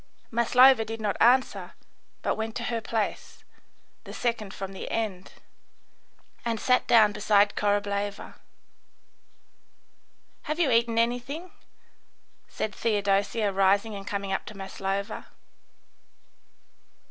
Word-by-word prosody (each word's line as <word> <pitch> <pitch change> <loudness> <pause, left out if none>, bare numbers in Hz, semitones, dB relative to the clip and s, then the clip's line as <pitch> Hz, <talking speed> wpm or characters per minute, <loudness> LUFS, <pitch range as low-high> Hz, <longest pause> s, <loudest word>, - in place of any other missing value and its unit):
Maslova 245 +1 +5
did 225 +1 -6
not 210 -3 -1
answer, 250 +2 +3 0.5
but - - +1
went 220 0 -4
on - - -4
to - - -3
her 230 - -1
place, 220 -1 -4 0.6
the - - -10
second 230 -4 -2
from 195 0 -7
the 190 - -7
end, 200 -5 -3 1.1
and 230 -2 -2
sat 250 +3 +2
down 220 -3 +6
beside 205 -1 +3
Korableva. 205 0 -1 2.2
"Have 310 +2 -2
you 305 -7 +3
eaten 230 0 +2
anything?" 245 +9 -1 1.0
said 215 - -4
Theodosia, 205 0 0
rising 195 +3 +2
and 195 -1 -8
coming 200 -3 -3
up 195 - -2
to 215 - -9
Maslova. 195 +2 -4
215 Hz, 110 wpm, -27 LUFS, 200-235 Hz, 2.2 s, down